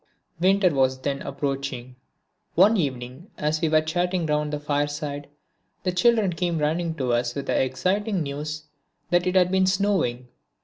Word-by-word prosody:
Winter 190 -1 +3
was 130 -1 +2
then 140 0 -2
approaching. 135 -3 -4 0.6
One 200 +6 +6
evening 135 - -3
as 155 +1 -1
we 165 - +2
were 155 0 +4
chatting 175 +2 -1
round 150 -1 0
the 150 - -2
fireside, 145 0 -2 0.5
the 185 - 0
children 210 0 +3
came 170 -1 -1
running 160 +2 0
to 130 -5 -1
us 120 0 0
with 140 - -4
the - - +1
exciting 185 - 0
news 150 +2 -5 0.5
that 175 0 +3
it 180 - 0
had 180 -1 +4
been 190 0 +3
snowing. 185 -11 0
155 Hz, 160 wpm, -24 LUFS, 140-180 Hz, 0.6 s, One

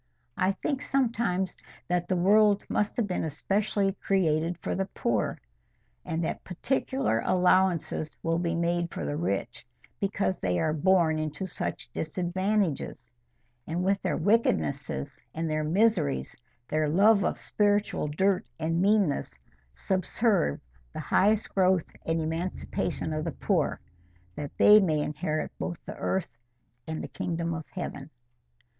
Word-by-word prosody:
I 185 +2 +2
think 270 +7 -2
sometimes 230 -9 0 0.3
that 175 0 0
the 185 - +1
world 205 +3 +4
must 210 - 0
have 235 - +2
been 185 -3 -2
especially 195 +5 0
created 170 -3 +1
for - - -3
the 195 0 -1
poor, 115 - -1 0.6
and 165 +1 -2
that - - -3
particular 260 - -1
allowances 180 -3 +2
will 165 0 +1
be 170 -1 -1
made 170 0 0
for - - -4
the 145 - -2
rich 150 - -2 0.4
because 195 -2 -1
they 90 -2 0
are 155 - +1
born 165 -1 +3
into 155 +4 -3
such 185 - -4
disadvantages, 175 - -1 0.6
and 170 +3 -1
with 195 +1 +1
their - - -1
wickednesses 120 - 0
and 165 +1 -1
their 155 0 0
miseries, 175 -3 +1 0.3
their 155 -1 +1
love 200 +5 +5
of - - 0
spiritual 205 -5 +1
dirt 185 +5 +1
and 165 +2 0
meanness, 190 - +1 0.3
subserve 190 - +1 0.3
the - - -5
highest 210 +2 +2
growth 185 -3 +3 0.2
and 165 0 +1
emancipation 160 -1 -2
of 155 0 -2
the 165 - -2
poor, - - 0 0.6
that 145 - -4
they 210 +1 +8
may 160 -7 +2
inherit 155 +1 -2
both 170 - -3
the - - -7
earth 165 -12 -2 0.5
and 160 0 -4
the - - -4
kingdom 170 -1 -3
of 160 -1 -6
heaven. 150 -6 -6
175 Hz, 140 wpm, -28 LUFS, 155-195 Hz, 0.6 s, they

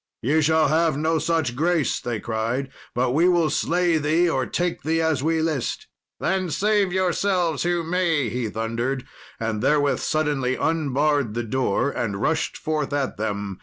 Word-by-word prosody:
"Ye 150 +7 +3
shall 160 -1 +3
have 160 -1 +2
no 160 +1 +1
such 160 -6 0
grace," 165 +1 +1
they 120 -3 -3
cried; 115 +5 -2 0.2
"but 125 +1 +1
we 165 +7 +4
will 170 -3 +2
slay 175 -1 +1
thee, 160 +4 +2
or 130 -6 0
take 175 0 -2
thee 160 +1 0
as 160 -4 +1
we 160 +2 +1
list." 155 -6 -2 0.3
"Then 190 -2 0
save 205 +2 +1
yourselves 185 -2 +1
who 175 -1 0
may," 165 -5 +1
he 115 0 -2
thundered, 115 +4 -2 0.3
and 110 -2 -2
therewith 145 +1 +2
suddenly 145 -5 0
unbarred 145 -6 0
the 120 - -1
door 130 +2 0
and 100 -7 -3
rushed 160 +8 0
forth 155 -2 -2
at 140 -2 -1
them. 100 -2 -3
150 Hz, 165 wpm, -23 LUFS, 125-165 Hz, 0.3 s, we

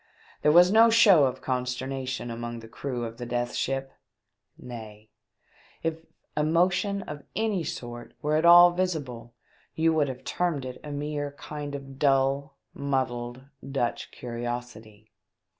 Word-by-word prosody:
There 150 - +4
was 175 +3 +7
no 225 +2 +7
show 205 -10 +7
of 130 0 -3
consternation 130 0 -3
among 120 0 -5
the 115 - -11
crew 120 0 -4
of 115 0 -7
the 120 - -6
Death 120 0 -2
Ship; 135 0 -2 0.6
nay, 110 -3 -10 0.7
if 165 0 -3 0.3
emotion 180 +6 +1
of 150 -1 -7
any 215 -5 0
sort 120 -4 -7
were 150 +1 0
at 155 - +2
all 175 +1 +9
visible, 145 -10 -3 0.4
you 165 0 +3
would 150 -2 +2
have 130 -1 -6
termed 165 -7 -1
it 125 -1 -7
a 150 - -7
mere 145 0 -3
kind 145 0 -6
of 135 -1 -9
dull, 140 0 +2 0.2
muddled, 130 -3 -2 0.3
Dutch 125 -4 -1
curiosity. 120 -3 -7
135 Hz, 140 wpm, -27 LUFS, 120-160 Hz, 0.7 s, all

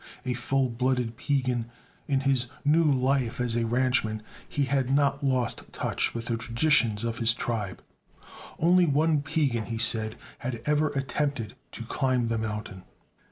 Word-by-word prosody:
A 125 - 0
full 130 +2 0
blooded 125 -1 0
Piegan, 125 -3 -1 0.4
in 135 -2 +1
his 135 -3 +1 0.2
new 155 +3 +4
life 130 -2 +1
as 120 -2 0
a 115 -1 +1
ranchman 120 -3 +1 0.3
he 145 - 0
had 135 -1 0
not 140 +1 +2
lost 130 -4 0
touch - - -1
with 115 -1 -4
the 115 -1 -1
traditions 115 -1 +2
of 115 0 -2
his 115 0 +3
tribe. 105 -7 -3 0.7
Only 175 +2 +4
one 150 +1 +2
Piegan, 145 -7 0
he 115 - -3
said, 110 -1 +2 0.2
had 120 -1 -4
ever 150 +1 +2
attempted 135 -4 -2 0.2
to 115 - -6
climb 125 0 0
the 115 -1 0
mountain. 105 -3 -4
125 Hz, 155 wpm, -27 LUFS, 115-140 Hz, 0.7 s, new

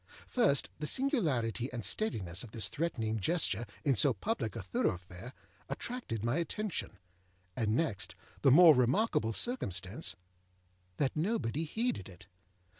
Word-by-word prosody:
First, 215 - +2
the 150 - -3
singularity 140 - +1
and 120 -5 -4
steadiness 100 - -1
of 120 - -9
this 105 -3 -2
threatening 115 - -2
gesture 120 - +1 0.2
in 140 -3 +4
so 135 +4 +5
public 125 - -2
a 110 - -5
thoroughfare 90 +3 -3 0.4
attracted 235 - -4
my 120 +6 +1
attention; 170 - -3 0.6
and 110 -3 +1
next, 120 - -1 0.3
the - - +5
more 160 +4 +9
remarkable 125 - +2
circumstance 105 - -2 0.8
that 135 - 0
nobody 160 - -1
heeded 220 - -2
it. 90 -1 -14
125 Hz, 125 wpm, -33 LUFS, 110-170 Hz, 0.8 s, more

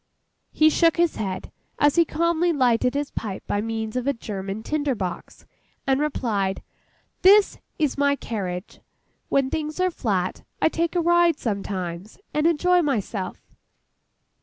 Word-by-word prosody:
He 310 0 +4
shook 330 +1 +3
his 340 -1 +2
head, 190 -3 -4 0.3
as 290 -1 +4
he 340 -1 +5
calmly 335 +2 +1
lighted 250 -3 +2
his 285 0 -2
pipe 200 -4 -5
by 205 - -1
means 220 0 -4
of 250 +1 -2
a 280 - +3
German 200 -2 -5
tinder 290 -2 -1
box, 185 -4 -6 0.4
and 270 0 +2
replied, 215 -10 -1 0.6
'This 400 +2 +6 0.2
is 295 -3 0
my 280 0 +3
carriage. 190 -7 -5 0.5
When 275 -1 +1
things 310 +1 -3
are 370 0 +2
flat, 190 - -2 0.2
I - - +3
take 335 +2 -1
a 350 - +3
ride 345 -1 +4
sometimes, 195 -3 -4 0.2
and 300 +2 +2
enjoy 355 +2 +3
myself. 220 - -2
275 Hz, 145 wpm, -24 LUFS, 205-320 Hz, 0.6 s, This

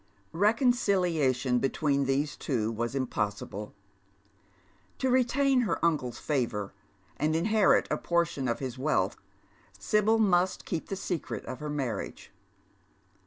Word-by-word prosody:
Keconciliation 180 - +2
between 140 +1 +1
these 140 +3 0
two 115 -6 -1
was 120 +3 -3
impossible. 105 -5 -3 1.2
To 260 -1 0
retain 260 +1 +3
her 230 - 0
uncle's 145 -8 0
favour 115 -9 -2 0.4
and 155 +1 +1
inherit 210 +5 +3
a - - 0
portion 170 -6 0
of 120 - 0
his 130 -2 -5
wealth, 150 +4 +1 0.6
Sibyl 215 +1 +2
must 185 -4 +2
keep 165 - -3
the 195 - -2
secret 180 -3 -4
of 130 - -6
her 150 - -5
marriage. 140 -6 -4
150 Hz, 120 wpm, -29 LUFS, 130-200 Hz, 1.2 s, retain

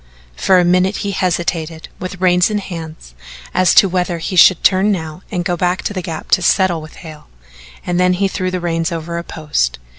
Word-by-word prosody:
For 185 - +3
a 180 - +3
minute 185 +3 +2
he 200 - -1
hesitated 170 -3 -2
with 185 0 -6
reins 180 0 +3
in 210 - -1
hand 165 -5 -6 0.6
as 185 -1 +3
to 195 - +7
whether 180 -1 -1
he 165 +3 -4
should 180 0 +6
turn 195 +2 +3
now 160 -3 -4
and 175 -2 -2
go 175 -1 0
back 180 +1 -1
to - - -3
the 185 - -3
Gap 165 -3 -7
to - - +4
settle 180 -2 +2
with 155 - -12
Hale, 155 -1 -11 0.6
and 175 0 -1
then 180 0 +3
he 195 +2 +1
threw 185 -1 -3
the 185 0 -3
reins 165 0 -2
over 170 +1 -4
a - - -6
post. 150 - -2
180 Hz, 210 wpm, -17 LUFS, 165-185 Hz, 0.6 s, to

